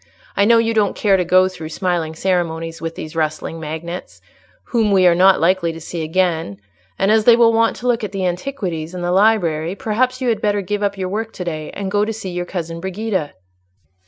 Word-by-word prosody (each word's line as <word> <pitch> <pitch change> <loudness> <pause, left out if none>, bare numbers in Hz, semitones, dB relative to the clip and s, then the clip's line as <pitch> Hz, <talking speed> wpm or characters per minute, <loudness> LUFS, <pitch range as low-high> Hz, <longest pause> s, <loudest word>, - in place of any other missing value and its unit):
I 200 - +3
know 230 +2 +6
you 230 0 +2
don't 210 -3 +1
care 200 -2 +3
to 185 - +2
go 185 +2 +4
through 160 -4 -7
smiling 165 -2 -2
ceremonies 165 -2 -2
with 165 0 -4
these 155 +1 -8
rustling 155 +1 -2
magnates, 160 +3 -6 0.5
whom 225 -3 +2
we 190 -2 +4
are 175 - +6
not 185 +2 +5
likely 170 0 +2
to 165 - -8
see 165 +1 -6
again; 160 - 0 0.4
and 195 +2 +2
as 220 -1 +3
they 235 - +8
will 230 -1 +5
want 230 0 +2
to 250 - -5
look 240 -2 +1
at 205 - -3
the 195 -2 -2
antiquities 180 - -3
and 180 - -5
the 175 - 0
library, 180 -5 +2
perhaps 250 +5 0
you 255 -2 0
had 220 -2 0
better 205 -1 0
give 205 +2 -3
up 200 -1 -1
your 185 -1 -3
work 220 +3 -3
to 180 - -5
day, 155 -3 -4
and 195 -1 -4
go 205 +1 +2
to 225 +1 -2
see 200 -4 -6
your 175 0 -3
cousin 170 -2 -5
Brigida." 190 -4 -3
185 Hz, 220 wpm, -19 LUFS, 165-210 Hz, 0.5 s, they